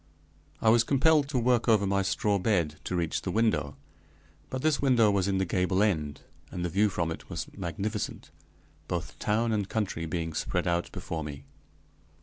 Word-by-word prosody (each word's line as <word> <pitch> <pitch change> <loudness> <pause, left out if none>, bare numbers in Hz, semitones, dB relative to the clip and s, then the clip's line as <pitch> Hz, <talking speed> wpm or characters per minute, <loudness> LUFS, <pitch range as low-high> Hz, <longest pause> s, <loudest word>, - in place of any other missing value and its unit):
I 110 - +5
was 115 +1 +5
compelled 145 +2 +3
to 140 - -1
work 120 0 +2
over 105 -3 +4
my 100 0 +1
straw 100 +1 +1
bed 90 -7 +1
to 90 - -2
reach 85 -2 -1
the - - -4
window, 85 -10 +1 0.7
but 130 0 -4
this 155 -2 +2
window 120 -6 +4
was 100 -1 +1
in 95 -1 +1
the 95 - +1
gable 95 +2 +1
end, 75 -8 -1 0.3
and 90 -1 -4
the - - -1
view 105 +5 +3
from 85 -4 -1
it - - -8
was - - -5
magnificent, 100 +4 -4 0.6
both - - -4
town 115 +2 +1
and 105 -3 -1
country 95 -7 -2
being 80 0 -3
spread - - -1
out 85 0 0
before 80 -1 -5
me. 70 -2 -8
100 Hz, 180 wpm, -28 LUFS, 85-110 Hz, 0.7 s, I